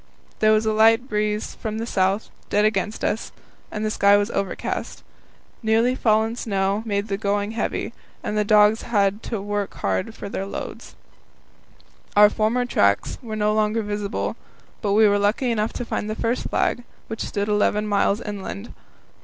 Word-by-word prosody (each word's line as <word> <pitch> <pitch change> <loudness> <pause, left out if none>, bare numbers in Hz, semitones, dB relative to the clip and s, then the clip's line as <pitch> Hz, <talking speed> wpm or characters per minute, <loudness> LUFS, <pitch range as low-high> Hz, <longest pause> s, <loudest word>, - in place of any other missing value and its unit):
There 215 0 +4
was 215 0 +3
a 220 - +1
light 225 +3 +4
breeze 210 -2 -1
from 220 -1 -5
the 225 - -3
south, 195 -1 0 0.2
dead 210 +1 +3
against 215 0 -1
us, 220 - -2 0.4
and 215 0 -3
the 215 - 0
sky 200 -1 +5
was 205 +2 0
overcast. 195 -1 -3 0.6
Newly 225 +2 +3
fallen 220 -2 +2
snow 200 -3 -1
made 200 0 -1
the 195 -2 -2
going 205 0 0
heavy, 230 +1 -3 0.3
and 210 - -3
the 210 - +2
dogs 210 +1 +5
had 205 -3 +1
hard 215 -4 -4
work 205 -1 -3
with 100 - -1 0.2
their 195 - -3
loads. - - -7 1.2
Our 210 0 +7
former 230 +3 +1
tracks 100 - +1
were 225 -4 -6
no 210 0 +1
longer 215 +1 +1
visible, 205 0 -3 0.5
but 200 -1 0
we 215 +1 +6
were 205 0 +3
lucky 215 +5 +1
enough 215 -1 0
to 245 - -4
find 215 -2 -3
the 215 - -2
first 230 +2 -1
flag, 245 - 0 0.2
which 225 - -5
stood 200 0 -2
eleven 210 0 +1
miles 205 +1 +1
inland. 205 +1 -6
210 Hz, 170 wpm, -23 LUFS, 205-220 Hz, 1.2 s, Our